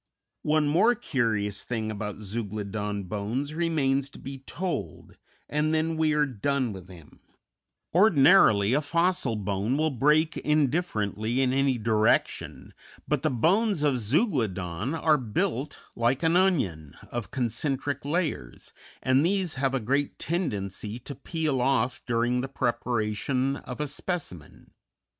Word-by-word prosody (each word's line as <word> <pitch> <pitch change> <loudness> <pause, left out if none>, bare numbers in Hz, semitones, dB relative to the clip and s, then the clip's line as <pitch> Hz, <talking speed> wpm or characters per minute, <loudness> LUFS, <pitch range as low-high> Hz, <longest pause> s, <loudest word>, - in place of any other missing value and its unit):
One 150 0 +2
more 195 +11 +4
curious 110 - -1
thing 110 -3 -3
about 105 0 -5
Zeuglodon 105 -1 -4
bones 110 +10 -3
remains 140 -5 +1
to - - -14
be 135 0 -8
told, 175 +7 -5 0.3
and 150 +1 0
then 160 +1 0
we 160 -1 +2
are 150 0 +3
done 130 -1 -1
with 95 -1 -10
him; 85 -5 -15 0.7
ordinarily 140 - +5
a 145 - +3
fossil 170 -4 +1
bone 105 +4 -1
will 155 0 +1
break 150 +5 +2
indifferently 130 - 0
in 130 -1 +2
any 135 -1 +2
direction, 110 -1 0 0.3
but 150 -3 0
the 155 - +1
bones 180 - +2
of 140 -4 +2
Zeuglodon 110 - 0
are 155 -2 +3
built, 125 +4 -2 0.2
like 120 +6 +1
an 165 +1 +3
onion, 100 - +1 0.2
of 120 -2 -4
concentric 135 +3 -1
layers, 150 - -3 0.3
and 130 +2 +3
these 185 -1 +1
have 135 0 0
a - - +1
great 140 +5 -1
tendency 105 - -3
to 130 +3 -7
peel 145 -1 -2
off 125 -1 +1
during 120 +1 +1
the 135 - -3
preparation 125 +1 -1
of 125 - -8
a 150 - 0
specimen. 145 - -5
135 Hz, 135 wpm, -27 LUFS, 110-155 Hz, 0.7 s, ordinarily